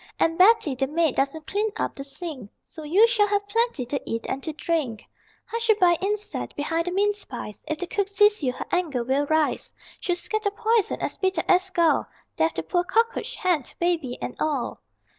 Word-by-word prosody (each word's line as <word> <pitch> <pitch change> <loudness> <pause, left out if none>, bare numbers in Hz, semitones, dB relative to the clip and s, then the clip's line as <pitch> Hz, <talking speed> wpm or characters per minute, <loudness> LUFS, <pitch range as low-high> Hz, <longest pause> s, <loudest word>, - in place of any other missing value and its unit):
And 330 - +2
Betty, 370 -5 +5
the 270 +1 0
maid, 315 -1 +1
doesn't 280 +3 -1
clean 420 +6 0
up - - -1
the 275 - -7
sink, 275 - -6
So 320 - -11
you 365 +10 +5
shall 435 -3 +3
have 405 0 0
plenty 455 - 0
to 275 +3 -3
eat 230 0 -4
and 270 - -3
to 315 - -3
drink. 300 -8 -2 0.4
Hushabye, 435 -7 +2
insect, 415 +2 -2
behind 330 +3 -1
the - - 0
mince 410 +2 +1
pies: 225 -4 -8
If 310 - -2
the 360 - -3
cook 395 +2 -1
sees 415 +1 +3
you 260 -3 +1
her - - -6
anger 310 -9 0
will 270 +4 0
rise; 315 0 +1 0.3
She'll 355 - 0
scatter 430 +4 -1
poison, 440 +1 +1
as - - -3
bitter 375 -3 +1
as 370 +1 +3
gall, 340 -3 +2 0.3
Death 320 - +1
to - - -2
poor 355 -1 0
cockroach, 465 +5 0
hen, 355 -5 +1 0.2
baby 330 -8 0
and - - -4
all. 290 -5 -2
345 Hz, 195 wpm, -25 LUFS, 290-410 Hz, 0.4 s, Betty